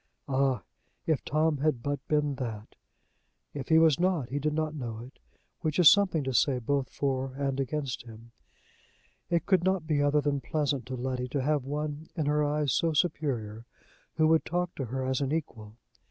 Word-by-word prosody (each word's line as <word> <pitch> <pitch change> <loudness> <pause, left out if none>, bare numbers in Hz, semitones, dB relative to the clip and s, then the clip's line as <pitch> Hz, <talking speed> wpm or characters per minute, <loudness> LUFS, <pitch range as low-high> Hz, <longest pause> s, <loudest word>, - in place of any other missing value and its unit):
Ah! 135 -6 +1 0.4
if 160 -3 0
Tom 155 0 +1
had 140 -4 0
but 145 -1 -1
been 150 -1 +1
that! 115 -5 -6 0.8
If 135 -3 -6
he 160 - +6
was 160 -2 +5
not, 175 -8 +1
he 140 +3 -2
did 150 +1 -1
not 155 -1 -1
know 120 -7 -5
it, 125 +4 -11 0.4
which 155 -3 -2
is 175 -4 +9
something 185 -7 +3
to 130 -1 -2
say 130 +1 +3
both 135 +2 -1
for 135 -1 -2
and 140 -1 -2
against 140 -1 -2
him. 115 0 -13 1.0
It 170 -1 +1
could 185 -3 +3
not 190 -3 +1
be 150 -2 +1
other 145 +1 +3
than 140 -1 0
pleasant 140 -5 -1
to 130 - -4
Letty 125 0 -3
to 135 +1 -2
have 145 -2 +1
one, 150 +2 -4
in 160 -4 -1
her 150 +1 +2
eyes 145 -2 0
so 165 -1 +1
superior, 125 - -1 0.5
who 155 0 +3
would 160 0 +4
talk 175 0 -2
to 135 - -4
her 130 +3 -3
as 130 +1 0
an 135 0 -1
equal. 110 -9 -4
145 Hz, 190 wpm, -29 LUFS, 130-155 Hz, 1.0 s, is